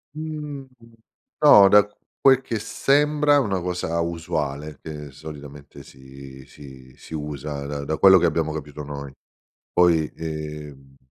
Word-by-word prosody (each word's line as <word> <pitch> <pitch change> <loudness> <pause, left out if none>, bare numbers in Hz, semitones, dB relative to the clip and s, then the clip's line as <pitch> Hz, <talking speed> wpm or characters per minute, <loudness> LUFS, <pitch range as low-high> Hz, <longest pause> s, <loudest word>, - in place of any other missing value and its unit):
Mhmm, 150 -3 -6 0.8
no, 105 -9 +8
da 105 0 +6 0.3
quel 135 -1 +6
che 115 -4 -4
sembra 145 +6 +2
una 100 -8 -1
cosa 90 -2 -3
usuale 75 -3 -4
che 75 -2 -8
solitamente 70 -1 -11
si 65 0 -13
si 65 -2 -14
si 80 - -10
usa 75 -1 -5
da 70 0 -5
da 80 +2 -3
quello 95 -1 +7
che 85 - +3
abbiamo 80 -1 -1
capito 75 -1 -7
noi. 70 -1 -7 0.6
Poi 85 -3 +3
ehm 75 -4 -8
75 Hz, 130 wpm, -23 LUFS, 70-95 Hz, 0.8 s, no